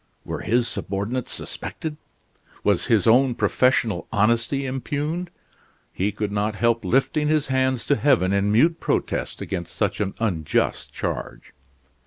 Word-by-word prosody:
were -, -, -4 dB
his 120 Hz, +1 st, +1 dB
subordinates 100 Hz, +6 st, -3 dB
suspected? 155 Hz, -2 st, -6 dB, 0.7 s
Was -, -, +2 dB
his 110 Hz, -5 st, +3 dB
own 125 Hz, +2 st, +5 dB
professional 115 Hz, -8 st, +1 dB
honesty 115 Hz, +6 st, +1 dB
impugned? 145 Hz, +6 st, -3 dB, 0.6 s
He 100 Hz, +3 st, 0 dB
could 105 Hz, 0 st, -3 dB
not 105 Hz, +1 st, -1 dB
help 115 Hz, +3 st, +1 dB
lifting 150 Hz, +3 st, +1 dB
his 155 Hz, -1 st, +2 dB
hands 130 Hz, -2 st, +1 dB
to 145 Hz, -, +3 dB
heaven 125 Hz, -11 st, +3 dB
in 100 Hz, +1 st, +2 dB
mute 160 Hz, +10 st, +4 dB
protest -, -, -2 dB
against 85 Hz, -2 st, -5 dB
such 105 Hz, -1 st, 0 dB
an 95 Hz, -2 st, -2 dB
unjust 90 Hz, -9 st, 0 dB
charge. -, -, -5 dB
115 Hz, 135 wpm, -23 LUFS, 100-135 Hz, 0.7 s, own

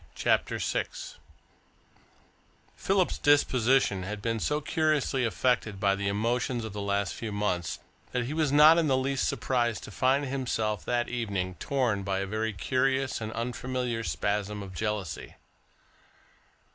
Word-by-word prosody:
CHAPTER -, -, +1 dB
VI -, -, 0 dB, 1.9 s
Philip's 190 Hz, -2 st, +1 dB
disposition 130 Hz, -7 st, +3 dB
had 105 Hz, +3 st, -5 dB
been 115 Hz, +1 st, -1 dB
so 150 Hz, +6 st, 0 dB
curiously 150 Hz, -4 st, +1 dB
affected 115 Hz, -3 st, 0 dB
by 100 Hz, -1 st, +3 dB
the 100 Hz, 0 st, -2 dB
emotions 115 Hz, +3 st, 0 dB
of 110 Hz, -, -7 dB
the 105 Hz, -, -4 dB
last 100 Hz, -1 st, 0 dB
few 115 Hz, -2 st, -5 dB
months 100 Hz, -5 st, -1 dB, 0.3 s
that 125 Hz, -1 st, 0 dB
he 140 Hz, -, -4 dB
was 155 Hz, -3 st, +1 dB
not 155 Hz, +3 st, +8 dB
in 165 Hz, -, +2 dB
the 135 Hz, -2 st, +3 dB
least 135 Hz, +1 st, 0 dB
surprised 120 Hz, -4 st, 0 dB
to -, -, -9 dB
find 135 Hz, +6 st, +2 dB
himself, 120 Hz, -6 st, -2 dB
that 120 Hz, -1 st, 0 dB
evening, 100 Hz, -7 st, -2 dB
torn 125 Hz, -7 st, 0 dB
by 95 Hz, 0 st, -1 dB
a 100 Hz, -, -1 dB
very 110 Hz, +3 st, -2 dB
curious 130 Hz, +6 st, 0 dB
and 110 Hz, 0 st, -4 dB
unfamiliar 125 Hz, 0 st, -2 dB
spasm 100 Hz, +5 st, -2 dB
of 95 Hz, -1 st, -9 dB
jealousy. 105 Hz, -2 st, -4 dB
115 Hz, 145 wpm, -28 LUFS, 100-130 Hz, 1.9 s, not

